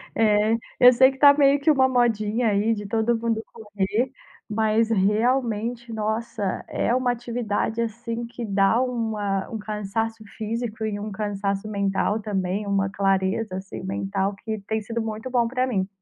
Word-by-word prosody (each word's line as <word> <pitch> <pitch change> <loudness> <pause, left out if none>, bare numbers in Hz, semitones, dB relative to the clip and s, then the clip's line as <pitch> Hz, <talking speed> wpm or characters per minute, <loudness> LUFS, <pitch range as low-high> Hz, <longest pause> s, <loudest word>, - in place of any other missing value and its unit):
É. 215 0 +3 0.2
Eu 250 0 +9
sei 260 +2 +6
que 270 - -13
tá 285 -1 +8
meio 280 -1 +4
que 280 - +1
uma 265 -3 +4
modinha 235 -2 +1
aí, 210 +2 +2
de 205 -1 -5
todo 225 +2 +1
mundo 225 -1 -1
correr, 210 +3 -2 0.4
mas 220 +1 +1
realmente, 230 +2 0
nossa, 215 -2 -2
é 240 - 0
uma 255 -1 +2
atividade, 235 -2 -2
assim, 230 +1 -4
que 235 0 -7
dá 200 +3 +3
uma 220 -6 -1
um 225 - -4
cansaço 215 +2 -3
físico 225 0 -3
e 205 -1 -3
um 210 0 -5
cansaço 200 0 -2
mental 200 +1 0
também, 200 -1 -2
uma 195 -1 +1
clareza, 195 +1 0
assim, 190 -1 -7
mental 195 +1 -2
que 220 +2 -5
tem 220 0 -1
sido 230 +2 -3
muito 220 +2 -5
bom 240 -2 +2
pra 255 +1 0
mim. 195 -7 -1
220 Hz, 160 wpm, -24 LUFS, 205-235 Hz, 0.4 s, Eu